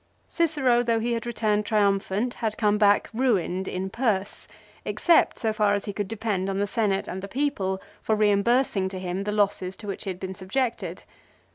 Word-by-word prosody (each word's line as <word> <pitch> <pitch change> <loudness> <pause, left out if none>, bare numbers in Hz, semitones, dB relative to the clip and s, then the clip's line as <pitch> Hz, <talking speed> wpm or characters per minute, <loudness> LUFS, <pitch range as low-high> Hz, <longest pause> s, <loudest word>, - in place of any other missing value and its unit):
Cicero 290 -8 +2
though 230 -1 +1
he 235 +1 -1
had 230 0 -3
returned 215 -3 0
triumphant 205 +2 +1
had 220 -2 -3
come 210 -2 +2
back 205 -1 +4
ruined 195 -7 0
in 190 +1 -3
purse, 215 -5 -1 0.4
except 340 -2 +3
so 220 -3 0
far 210 -1 +2
as 200 - -3
he 205 - -4
could 205 -1 -3
depend 205 -3 -2
on 195 - -2
the 200 - +1
Senate 200 -2 0
and 190 - -5
the 200 - -6
people 200 -7 -1 0.2
for 220 - +1
reimbursing 210 0 +2
to 190 - -7
him 185 +1 -3
the 210 - -1
losses 200 -3 0
to 210 - -12
which 200 +1 -5
he - - -3
had 185 -1 -5
been 190 0 -5
subjected. 230 +6 -3
205 Hz, 190 wpm, -25 LUFS, 195-230 Hz, 0.4 s, back